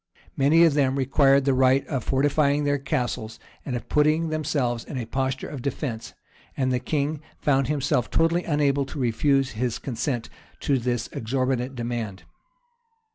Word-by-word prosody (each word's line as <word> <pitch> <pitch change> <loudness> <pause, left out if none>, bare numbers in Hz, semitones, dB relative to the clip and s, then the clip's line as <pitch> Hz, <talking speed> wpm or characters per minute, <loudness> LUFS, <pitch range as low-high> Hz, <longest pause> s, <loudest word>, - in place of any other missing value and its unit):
Many 150 +5 +5
of 165 -3 +5
them 135 -2 +2
required 135 0 +3
the 135 - +3
right 130 +1 +3
of 135 -6 -3
fortifying 145 +2 +2
their 145 0 +1
castles, 125 -5 -3 0.3
and 130 - -4
of 120 - -5
putting 155 +2 +2
themselves 145 -6 -1
in 140 - -7
a 120 - -3
posture 130 +2 -2
of 140 - -7
defence; 125 -3 -4 0.4
and 130 -1 +1
the 125 - +1
king 150 +2 -2 0.2
found 135 -3 +1
himself 135 -4 0
totally 165 +2 +2
unable 140 -3 +1
to 145 - -7
refuse 135 +2 +1
his 120 +1 -2
consent 120 -1 -3 0.3
to 140 -2 +1
this 120 -1 -1
exorbitant 130 +2 -1
demand. 115 -5 -4
135 Hz, 155 wpm, -25 LUFS, 125-145 Hz, 0.4 s, Many